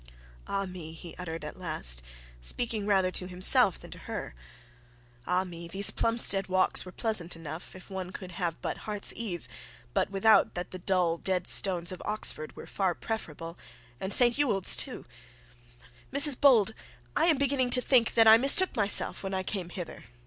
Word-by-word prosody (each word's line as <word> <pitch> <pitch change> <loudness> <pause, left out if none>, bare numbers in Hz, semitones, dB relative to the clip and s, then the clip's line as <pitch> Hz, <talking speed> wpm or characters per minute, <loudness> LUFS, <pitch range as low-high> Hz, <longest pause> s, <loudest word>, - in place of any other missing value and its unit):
'Ah, 195 0 -3
me!' 180 -4 -10
he 165 0 -11
uttered 165 -3 -7
at 150 - -9
last, 65 - 0 0.4
speaking 215 - -3
rather 190 -3 +1
to 185 - -4
himself 180 0 +5
than - - -14
to - - -10
her. - - -6 0.9
'Ah, 180 +1 0
me! 170 -2 -10
These 195 +4 +2
Plumstead 230 -4 +2
walks 185 0 0
were 185 - -11
pleasant 190 -6 -3
enough, 165 +2 -9
if 185 - -13
one 190 -2 -7
could 185 -1 -9
have 170 -2 -4
but - - -4
heart's 210 -1 -4
ease; 175 - -5 0.5
but - - 0
without 200 +3 +2
that, 175 0 -6
the 185 - -8
dull 180 -2 0
dead 185 -2 -2
stones 180 -3 +4
of 185 - -9
Oxford 180 -7 -3
were - - -11
far 190 -3 -2
preferable; 165 -6 -7 0.4
and 190 - -5
St 240 +5 +3
Ewold's 205 -10 +3
too; - - -3 1.1
Mrs 285 -1 +6
Bold, 230 -7 +4 0.4
I - - +2
am 325 -4 +2
beginning 270 -2 0
to 250 - +5
think 245 -3 +2
that 225 -1 +5
I 220 0 +8
mistook 280 +9 +4
myself 205 -2 0
when 195 -1 -5
I 190 - -3
came 185 -2 -5
hither. 175 -1 -9
190 Hz, 175 wpm, -27 LUFS, 175-220 Hz, 1.1 s, I